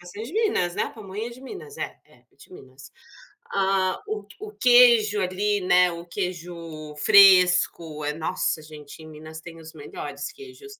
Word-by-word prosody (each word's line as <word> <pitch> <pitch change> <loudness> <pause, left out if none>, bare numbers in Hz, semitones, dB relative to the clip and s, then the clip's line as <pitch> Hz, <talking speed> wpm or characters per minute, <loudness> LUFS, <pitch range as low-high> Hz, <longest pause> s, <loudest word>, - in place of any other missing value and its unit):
de 210 - -9
Minas, 410 - 0
né? 205 - 0
A - - -7
pamonha 210 0 -7
é - - -12
de 240 +2 -13
Minas? 420 - -10
É, - - -5
é, - - -25
é - - -34
de - - -18
Minas. 135 -2 -14 0.6
Ah, 190 -1 0
o 430 0 -5
o 425 0 -8
queijo 235 -4 +5
ali, 200 +3 -1
né, 180 0 +4
o 170 0 -8
queijo 170 -4 -6
fresco, 180 -4 +5
é 150 - -1
Nossa, 160 0 -2
gente, 150 0 -12
em - - -12
Minas 155 +1 -11
tem 165 0 -12
os 160 0 -12
melhores 145 -1 -7
queijos. 415 +1 -13
180 Hz, 170 wpm, -24 LUFS, 160-215 Hz, 0.6 s, queijo